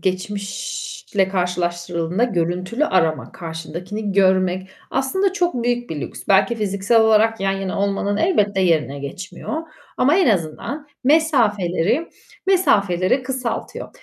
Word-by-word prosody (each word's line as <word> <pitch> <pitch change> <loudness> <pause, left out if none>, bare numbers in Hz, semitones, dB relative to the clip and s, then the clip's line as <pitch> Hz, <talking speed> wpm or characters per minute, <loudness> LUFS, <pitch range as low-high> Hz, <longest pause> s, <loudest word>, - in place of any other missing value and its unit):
geçmişle 200 - -2
karşılaştırıldığında 175 +1 -1
görüntülü 185 - -1
arama, 160 - +1
karşındakini 175 +5 -5
görmek 185 -1 +2 0.2
aslında 355 +9 +1
çok 350 -11 0
büyük 240 0 -1
bir 150 -3 -4
lüks. - - -7
Belki 195 +4 +4
fiziksel 210 +1 +2
olarak 220 0 +4
yan 195 0 +1
yana 195 0 -3
olmanın 200 0 0
elbette 210 - +2
yerine 155 -6 +1
geçmiyor 185 - -5 0.3
ama 285 +7 +4
en 370 -9 +4
azından 205 - -2 0.2
mesafeleri 240 - +2 0.4
mesafeleri 205 - +3
kısaltıyor. 255 -2 -4
200 Hz, 110 wpm, -21 LUFS, 180-245 Hz, 0.4 s, Belki